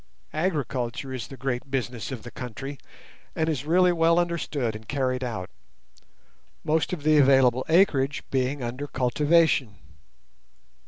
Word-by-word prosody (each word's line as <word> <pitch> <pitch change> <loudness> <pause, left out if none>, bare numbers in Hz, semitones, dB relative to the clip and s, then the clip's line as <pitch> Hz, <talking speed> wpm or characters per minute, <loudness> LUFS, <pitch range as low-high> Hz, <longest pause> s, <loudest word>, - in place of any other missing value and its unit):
Agriculture 140 -6 -2
is 125 -4 -5
the 135 - -10
great 135 0 -3
business 125 -2 -3
of 125 -4 -6
the 120 - -9
country, 130 +3 -7 0.6
and 160 - 0
is 145 -3 -2
really 180 +2 +4
well 165 0 +3
understood 155 -9 -1
and 110 +1 -10
carried 130 -2 -1
out, 110 -7 -4 1.2
most 155 +1 +1
of 170 -5 -4
the 155 0 +5
available 130 -2 +5
acreage 150 -5 +3
being 130 +1 0
under 125 +5 -4
cultivation. 140 -2 +2
135 Hz, 130 wpm, -26 LUFS, 125-155 Hz, 1.2 s, the